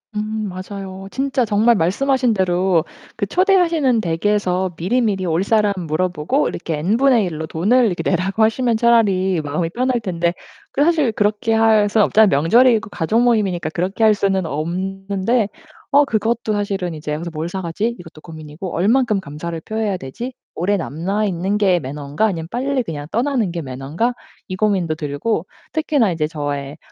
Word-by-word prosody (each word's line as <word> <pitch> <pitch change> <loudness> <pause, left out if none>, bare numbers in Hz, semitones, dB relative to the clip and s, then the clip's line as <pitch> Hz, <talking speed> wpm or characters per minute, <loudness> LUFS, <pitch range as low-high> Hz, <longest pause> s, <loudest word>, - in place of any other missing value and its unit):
음 215 -1 -3
맞아요. 190 +1 -7
진짜 265 -2 0
정말 220 +3 +3
말씀하신 250 +8 +1
대로 180 -3 +2 0.3
그 200 -3 -2
초대하시는 335 - +3
댁에서 185 +1 0
미리미리 200 0 0
올 165 +3 +1
사람 210 -1 +2
물어보고 175 - 0
이렇게 160 -3 -4
N분의 230 - +3
일로 160 -2 -4
돈을 215 +11 +2
이렇게 180 -5 -1
내라고 190 +4 0
하시면 225 +1 +2
차라리 200 -6 +3
마음이 155 +3 -2
편할 250 +4 0
텐데 170 -3 -1 0.4
그 285 - +1
사실 310 -7 +2
그렇게 210 +2 0
할 220 -2 +4
순 215 +1 +3
없잖아요. 215 0 +5
명절이고 230 +5 +4
가족모임이니까 205 -4 +1
그렇게 185 +7 -2
할 215 -1 +6
수는 195 -2 0
없는데 195 - -1 0.4
어 285 +1 +5
그것도 225 -1 -1
사실은 195 -4 -2
이제 150 0 -5
여기서 170 +3 -4
'뭘 155 +2 -3
사 190 +2 -4
가지?' 210 +8 -2
이것도 165 -3 -13
고민이고 160 +2 -8
'얼만큼 215 +3 +2
감사를 165 +2 -6
표해야 215 -2 -2
되지? 235 - -7 0.2
오래 200 +4 +1
남아 190 +7 -2
있는 190 +2 -1
게 185 -4 +3
매너인가 145 +7 -2
아니면 165 -6 -2
빨리 265 +1 0
그냥 150 -6 -6
떠나는 235 -5 0
게 170 -1 -4
매너인가?' 140 - -2 0.3
이 185 - -4
고민도 185 -6 0
들고 155 +6 -2 0.3
특히나 295 - +1
이제 160 -2 -1
저의 145 -2 -4
195 Hz, 375 characters per minute, -19 LUFS, 170-225 Hz, 0.4 s, 할